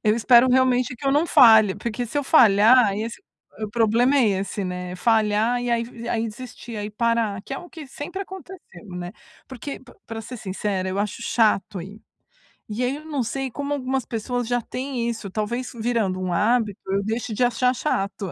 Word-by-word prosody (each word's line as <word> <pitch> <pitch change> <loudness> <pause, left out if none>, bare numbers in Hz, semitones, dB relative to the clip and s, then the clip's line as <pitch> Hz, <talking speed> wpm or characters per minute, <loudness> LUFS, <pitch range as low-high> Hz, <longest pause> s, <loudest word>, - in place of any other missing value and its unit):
Eu 210 0 +4
espero 240 +2 +5
realmente 255 -1 +2
que 275 - -6
eu 270 - +3
não 305 +4 +2
falhe, 220 -8 +6
porque 235 +3 -4
se 235 - -7
eu 285 - 0
falhar, 225 -4 +6
esse 225 - -5 0.4
o 215 - -2
problema 235 +4 +2
é 255 -5 +4
esse, 200 0 -4
né, 180 0 -5
falhar 220 +2 +2
e 245 - -2
aí 235 0 -3
aí 230 0 0
desistir, 240 +1 -9
aí 205 - -4
parar, 225 -3 0
que 270 - -9
é 270 - -3
o 350 - -11
que 315 -4 -10
sempre 295 +8 -6
aconteceu, 370 - -12
né, 175 +1 -6 0.3
porque 265 +2 -7 0.3
para 225 0 -6
ser 250 +3 -8
sincera 190 -1 -3
eu 190 +1 -3
acho 210 +2 -2
chato 215 -5 +1
ir, 200 +4 -11 0.7
e 220 +4 -3
aí 255 +3 -1
eu 305 - -13
não 290 -5 -2
sei 270 +3 -3
como 285 +4 -4
algumas 265 -2 -2
pessoas 245 +1 -3
já 245 0 0
têm 250 0 -3
isso, 220 -4 -5
talvez 235 +4 -3
virando 225 -5 -1
um 185 -1 -2
hábito, 215 +1 +1
eu 200 +1 +1
deixo 225 +2 -3
de 230 - 0
achar 250 +1 +2
chato 200 -7 -2
235 Hz, 195 wpm, -23 LUFS, 210-255 Hz, 0.7 s, falhe